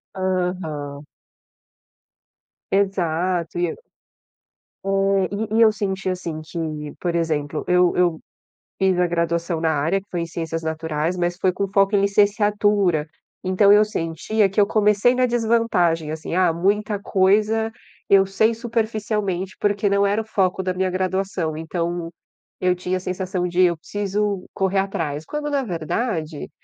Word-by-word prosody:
Aham. 180 -6 -3 1.7
Exato 180 -3 0
e 175 - +2
eu - - -5 1.1
É, 195 0 +2 0.3
e - - +3
e - - +5
eu 220 -1 +7
senti 195 -2 -3
assim 170 -4 -4
que, 155 -2 -5
por 175 -1 -2
exemplo, 155 -3 -1
eu 180 0 +3
eu 175 -3 +2 0.6
fiz 190 -2 +2
a 180 - +3
graduação 170 0 -1
na 160 -1 +2
área, 160 +6 +1
que 195 - -27
foi 175 - -2
em - - -2
ciências 165 -1 -4
naturais, 160 +1 -2
mas 175 0 -1
foi 185 0 +2
com 200 - -1
foco 195 +1 +3
em 200 - +3
licenciatura, 205 -4 +2 0.4
então 185 +2 +4
eu 210 +1 +6
sentia 200 +3 0
que 195 - -1
eu 200 - +5
comecei 210 +3 +3
na 255 0 +3
desvantagem, 225 -10 +1
assim. 160 +1 -5
Ah, 180 -2 +4
muita 205 +4 0
coisa 215 +4 +2 0.4
eu 195 -1 +6
sei 220 +4 +2
superficialmente, 215 -5 -2
porque 205 0 +1
não 200 0 +3
era 205 +2 +1
o - - -10
foco 190 -3 0
da 185 -1 -1
minha 185 +1 0
graduação. 185 -3 -1
Então, 170 +1 -3 0.5
eu 180 -1 +2
tinha 180 +1 -2
a - - -4
sensação 185 0 -2
de: 175 +1 +1
eu 175 -2 +3
preciso 205 +2 -2
correr 195 0 +1
atrás, 160 -6 -2
quando 295 - -4
na 280 -2 0
verdade, 170 - -3
185 Hz, 150 wpm, -22 LUFS, 170-205 Hz, 1.7 s, eu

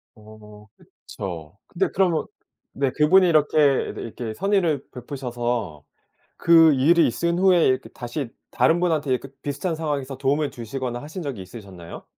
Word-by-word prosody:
어 105 -1 -15
그쵸. 85 -2 -9
근데 185 +2 -1
그러면 180 -5 +1 0.5
네 135 -1 0
그분이 180 +7 +4
이렇게 155 -3 +2 0.4
이렇게 115 -1 -6
선의를 175 - 0
베푸셔서 120 - -4 0.5
그 165 -2 +6
일이 160 +6 +4
있은 170 +8 -1
후에 185 -3 +4
이렇게 130 0 0
다시 120 +1 -6 0.2
다른 160 +7 +2
분한테 160 -6 0
이렇게 130 +1 -1
비슷한 155 +5 -3
상황에서 145 -4 -3
도움을 140 +2 0
주시거나 120 +1 -5
하신 160 +5 -7
적이 135 -10 -5
있으셨나요? 95 -4 -11
135 Hz, 335 characters per minute, -23 LUFS, 120-165 Hz, 0.5 s, 그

